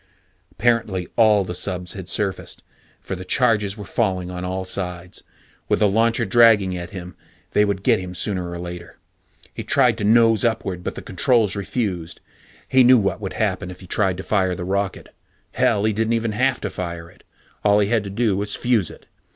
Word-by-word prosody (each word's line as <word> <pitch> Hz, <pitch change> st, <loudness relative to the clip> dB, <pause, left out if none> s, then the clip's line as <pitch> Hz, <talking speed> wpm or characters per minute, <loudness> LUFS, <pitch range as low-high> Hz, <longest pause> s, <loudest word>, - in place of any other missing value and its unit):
Apparently 115 Hz, -6 st, 0 dB
all 110 Hz, -3 st, +4 dB
the 90 Hz, -, -5 dB
subs 90 Hz, 0 st, -2 dB
had 95 Hz, -3 st, -8 dB
surfaced, 100 Hz, -4 st, -2 dB, 0.4 s
for -, -, -5 dB
the 90 Hz, -, -7 dB
charges 105 Hz, -2 st, +1 dB
were 105 Hz, -, -8 dB
falling 95 Hz, -6 st, -1 dB
on 90 Hz, 0 st, -6 dB
all 95 Hz, +1 st, -3 dB
sides. 90 Hz, -1 st, -4 dB, 0.5 s
With -, -, +3 dB
the 105 Hz, -, +3 dB
launcher 115 Hz, +3 st, +2 dB
dragging 105 Hz, -4 st, +4 dB
at 85 Hz, -1 st, -6 dB
him, 90 Hz, -3 st, -9 dB, 0.4 s
they 105 Hz, -, +3 dB
would 100 Hz, -1 st, -2 dB
get -, -, +3 dB
him 90 Hz, 0 st, -7 dB
sooner 90 Hz, 0 st, -2 dB
or 85 Hz, -, -6 dB
later. 85 Hz, -1 st, -8 dB, 0.6 s
He -, -, -6 dB
tried 125 Hz, -5 st, +2 dB
to -, -, -2 dB
nose 115 Hz, 0 st, +4 dB
upward, 95 Hz, -6 st, -1 dB
but -, -, -4 dB
the -, -, -8 dB
controls 105 Hz, +2 st, +1 dB
refused. 95 Hz, -5 st, -3 dB, 0.5 s
He 130 Hz, 0 st, +5 dB
knew 125 Hz, +1 st, +7 dB
what 100 Hz, -4 st, -1 dB
would -, -, -4 dB
happen 90 Hz, -, -1 dB
if 90 Hz, 0 st, -10 dB
he -, -, -11 dB
tried 95 Hz, 0 st, 0 dB
to 95 Hz, -, -6 dB
fire 95 Hz, -4 st, +1 dB
the 90 Hz, -, -6 dB
rocket. 100 Hz, +1 st, -3 dB, 0.4 s
Hell, 100 Hz, -, +1 dB
he 110 Hz, 0 st, +2 dB
didn't 115 Hz, +1 st, 0 dB
have 125 Hz, +4 st, +1 dB
to 105 Hz, -, -3 dB
fire 85 Hz, -2 st, -5 dB
it. -, -, -23 dB, 0.4 s
All 105 Hz, 0 st, +4 dB
he 105 Hz, -1 st, +2 dB
had 115 Hz, -3 st, +1 dB
to 100 Hz, -, -6 dB
do 105 Hz, 0 st, 0 dB
was 100 Hz, +1 st, -1 dB
fuse 115 Hz, -7 st, +1 dB
it. -, -, -14 dB
100 Hz, 195 wpm, -21 LUFS, 90-110 Hz, 0.6 s, knew